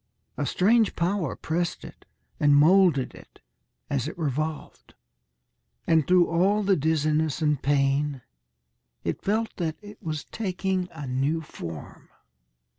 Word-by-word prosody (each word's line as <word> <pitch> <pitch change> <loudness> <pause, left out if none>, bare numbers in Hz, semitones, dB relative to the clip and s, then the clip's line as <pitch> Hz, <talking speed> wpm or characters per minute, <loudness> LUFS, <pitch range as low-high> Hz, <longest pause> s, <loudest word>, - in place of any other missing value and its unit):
A 145 - -2
strange 220 - +3
power 175 -3 -1
pressed 170 +1 -3
it - - -13 0.3
and 145 -1 +5
moulded 165 -2 +4
it, - - -16 0.5
as 140 -1 -1
it 160 - -7
revolved, 155 0 -4 0.9
and 160 -3 +3
through 180 -1 +5
all 195 +5 +2
the 195 -1 +3
dizziness 155 -1 +1
and 150 -3 +1
pain 140 -1 +1 0.8
it - - -3
felt 220 +2 -1
that 160 -3 -2
it 205 0 -13
was 155 -2 -4
taking 190 -3 -2
a 155 -4 -7
new 135 +5 0
form. 85 - -9
160 Hz, 125 wpm, -26 LUFS, 145-185 Hz, 0.9 s, and